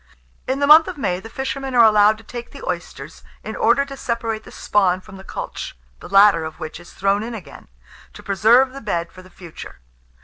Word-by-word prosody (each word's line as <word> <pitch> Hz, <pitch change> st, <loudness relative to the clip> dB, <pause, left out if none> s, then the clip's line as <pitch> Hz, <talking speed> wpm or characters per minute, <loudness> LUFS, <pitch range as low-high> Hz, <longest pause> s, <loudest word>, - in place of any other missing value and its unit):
In 260 Hz, +1 st, 0 dB
the 285 Hz, -, +1 dB
month 310 Hz, +3 st, +8 dB
of 365 Hz, -4 st, -6 dB
May, 180 Hz, -10 st, -1 dB
the 225 Hz, -, -11 dB
fishermen 265 Hz, +1 st, -4 dB
are 235 Hz, -, +7 dB
allowed 215 Hz, 0 st, +5 dB
to 225 Hz, -, -16 dB
take 240 Hz, +2 st, -8 dB
the 280 Hz, -, -11 dB
oysters, 165 Hz, -3 st, -6 dB, 0.2 s
in 220 Hz, -, -6 dB
order 240 Hz, +5 st, +2 dB
to 275 Hz, 0 st, -9 dB
separate 230 Hz, -4 st, -3 dB
the -, -, -12 dB
spawn 185 Hz, -3 st, +1 dB
from 190 Hz, +1 st, -13 dB
the 190 Hz, -, -12 dB
cultch, -, -, -7 dB, 0.2 s
the -, -, -11 dB
latter 195 Hz, -3 st, +5 dB
of 160 Hz, 0 st, -8 dB
which 155 Hz, -, -7 dB
is 175 Hz, -, -14 dB
thrown 195 Hz, +2 st, 0 dB
in 230 Hz, +1 st, -5 dB
again, 195 Hz, -7 st, -12 dB, 0.5 s
to -, -, -13 dB
preserve 235 Hz, +6 st, +3 dB
the 275 Hz, -, -9 dB
bed 170 Hz, -6 st, -3 dB
for 185 Hz, -, -13 dB
the 185 Hz, -, -17 dB
future. 175 Hz, -3 st, -11 dB
215 Hz, 215 wpm, -20 LUFS, 185-250 Hz, 0.5 s, month